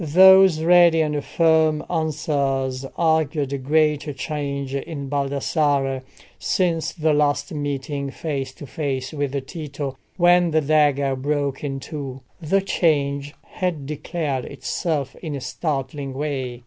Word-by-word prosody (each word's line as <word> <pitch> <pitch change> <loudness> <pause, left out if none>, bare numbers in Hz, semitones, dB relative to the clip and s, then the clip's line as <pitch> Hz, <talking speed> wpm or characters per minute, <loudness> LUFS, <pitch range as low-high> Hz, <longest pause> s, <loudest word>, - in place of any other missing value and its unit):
Those 190 +1 +7
ready 170 -1 +6
and 150 -2 -1
firm 160 -2 +2
answers 140 -5 -1
argued 160 -4 +1
a 140 - -2
great 150 +1 +1
change 140 -3 -3
in 140 0 -4
Baldassarre 140 -1 0 0.4
since 170 -4 0
the 160 -2 +1
last 145 0 +1
meeting 140 -1 -3
face 135 -2 -4
to - - -9
face 135 -2 -3
with 140 -2 -2
Tito, 145 -3 -5 0.2
when 175 -1 +5
the 155 0 +2
dagger 145 -2 +2
broke 140 0 -2
in 135 -2 -3
two. 135 -2 -7 0.2
The 195 +5 +2
change 145 -6 0
had 175 -6 -3
declared 150 -2 -3
itself 145 0 -3
in 155 -4 -5
a - - -4
startling 135 0 -3
way. 135 -4 -3
145 Hz, 125 wpm, -22 LUFS, 140-160 Hz, 0.4 s, Those